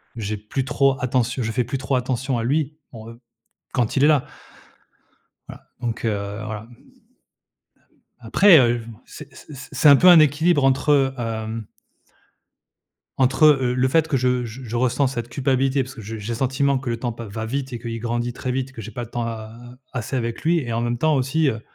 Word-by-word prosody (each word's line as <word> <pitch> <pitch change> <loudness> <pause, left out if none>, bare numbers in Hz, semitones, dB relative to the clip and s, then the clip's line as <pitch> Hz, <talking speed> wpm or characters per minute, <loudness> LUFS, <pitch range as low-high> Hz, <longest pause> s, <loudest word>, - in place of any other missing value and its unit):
j'ai 105 -2 -4
plus 110 +6 -4
trop 135 -1 +2
attentio 125 0 0
je 110 - -2
fais 125 +3 0
plus 125 +4 -4
trop 135 +1 -4
attention 130 +1 -1
à - - -2
lui, 150 +4 -1
en, 110 -1 -10
heu, 115 - -15 0.5
quand 120 +2 0
il 135 - +3
est - - +6
là. 150 -4 +3 1.2
Voilà, - - -11 0.2
donc, 120 -2 -4
heu, - - +2 0.4
voilà. 110 +1 -6 1.5
Après, 165 - +6
heu, 120 -3 +4
v 115 - -9
m 115 -2 -11
c 150 - -12
c - - -15 0.3
c'est 150 - +4
un 140 - +9
peu 180 - +5
un 175 -2 +9
équilibre 155 0 +3
entre, 135 0 +2
hem 110 -2 -4 1.5
entre, 135 +3 +4
heu 145 -3 +5
heu, - - -2
le 130 +1 +2
fait 160 +4 +2
que 155 -4 0
je 125 -1 +1
j 120 +3 -8
je 120 0 -4
ressens 130 +3 +1
cette 120 -3 -5
culpabilité 135 0 0
parce 130 +1 -9
que - - -8
je 110 +1 -7
j'ai 105 +1 -7
le - - -5
sentiment 135 +2 +1
que 130 -1 -7
le 115 -1 -2
temps 120 - -2
pa 115 +1 -8
va 110 +2 -5
vite 135 +2 -4
et 120 - -5
qu'il 115 -1 -5
grandit 120 +1 -2
très 125 +1 -4
vite, 130 +1 -3
que 120 - -9
j'ai 110 +1 -8
pas 120 +3 -5
de 115 - -15
temps 120 -1 -3
a 110 -1 -6 0.4
assez 125 0 -4
avec 115 -2 -3
lui 170 +2 +3
et 120 -5 -5
en 115 - -1
même 120 0 -2
temps, 155 +2 +2
aussi, 135 +4 +1
heu, 110 -4 -2
125 Hz, 215 wpm, -22 LUFS, 115-135 Hz, 1.5 s, un